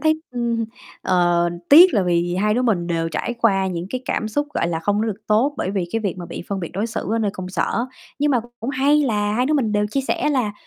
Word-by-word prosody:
thấy, 315 0 +2
ừm, 235 -2 -1 0.4
ờ, 175 -2 +2 0.2
tiếc 345 +6 +8
là 200 - +3
vì 175 0 0
hai 210 +3 +1
đứa 250 - +1
mình 195 -8 +1
đều 165 -1 -1
trải 240 +9 -3
qua 195 -5 +2
những 175 -2 -3
cái 255 - -3
cảm 220 -5 -1
xúc, 290 +7 -1
gọi 170 - 0
là, 165 -1 -1
không 205 +4 0
có 225 - 0
được 215 -1 -4
tốt 230 +7 +2
bởi 185 - -2
vì 195 -3 -1
cái 225 - 0
việc 195 -4 -3
mà 175 - -6
bị - - -7
phân 195 -1 -2
biệt 170 - -5
đối 200 +5 -1
xử 220 -2 -4
ở 230 - +1
nơi 210 -2 0
công 185 -1 -6
sở. 230 +5 -1 0.3
Nhưng 295 +1 +2
mà 250 -4 +2 0.2
cũng 240 +4 -3
hay 285 +3 +3
là 210 -5 0
hai 250 +4 +1
đứa 305 - +1
mình 230 -7 +1
đều 210 0 +1
chia 275 - 0
sẻ 270 +2 -1
là 250 -7 0
215 Hz, 270 wpm, -21 LUFS, 185-250 Hz, 0.4 s, tiếc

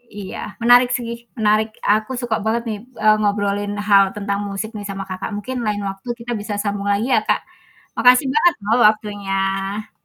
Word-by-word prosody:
Iya 200 -2 -7 0.3
menarik 245 +1 +6
sih, 235 -1 -7
menarik, 215 0 +2 0.2
aku 215 +3 +1
suka 235 -2 -1
banget 230 +2 0
nih, 210 - -3 0.3
eee, 215 0 +6
ngobrolin 205 0 0 0.2
hal 200 -1 +7
tentang 200 -1 -2
musik 200 +3 -4
nih 210 - -5
sama 195 0 -4
Kakak, 185 +1 -4
mungkin 255 +5 -5
lain 210 -1 -1
waktu 195 +5 -9
kita 240 +1 -6
bisa 205 0 -5
sambung 205 -1 -2
lagi 205 +4 0
ya 220 - +5
Kak, - - +2 0.6
makasih 250 +3 +6
banget 335 +3 +4
loh 225 +4 +2
waktunya. 200 -1 -3
210 Hz, 175 wpm, -20 LUFS, 200-230 Hz, 0.6 s, hal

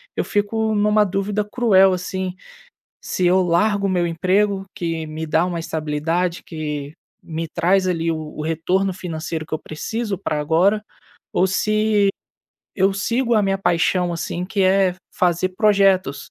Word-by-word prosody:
eu - - 0
fico 220 +1 0
numa 210 0 +3
dúvida 200 +2 -1
cruel, 205 -4 +4
assim. 185 0 -3 0.7
Se 185 - -2
eu 185 +2 +4
largo 200 +4 +2
o - - 0
meu 180 -2 +1
emprego, 190 +4 +1
que 165 -4 -3
me 155 +1 -5
dá 160 +2 +2
uma 175 -2 -3
estabilidade, 160 +3 -2
que 150 -3 -5 0.3
me 165 0 -4
traz 185 +3 +2
ali 165 -2 0
o - - -2 0.2
o - - -3
retorno 170 +5 0
financeiro 160 -3 -5
que - - -4
eu 155 - -2
preciso 205 +5 -4
pra 155 -5 -2
agora, 180 +8 +2 0.5
ou 185 - +3
se 215 +1 +2 0.7
eu 195 0 +3
sigo 235 +4 0
a 215 - +4
minha 195 -1 0
paixão, 175 0 +1
assim, 170 +1 -3
que 195 0 0
é 190 -1 +3 0.2
fazer 180 +1 +1
projetos 195 -6 +2
185 Hz, 155 wpm, -21 LUFS, 165-200 Hz, 0.7 s, cruel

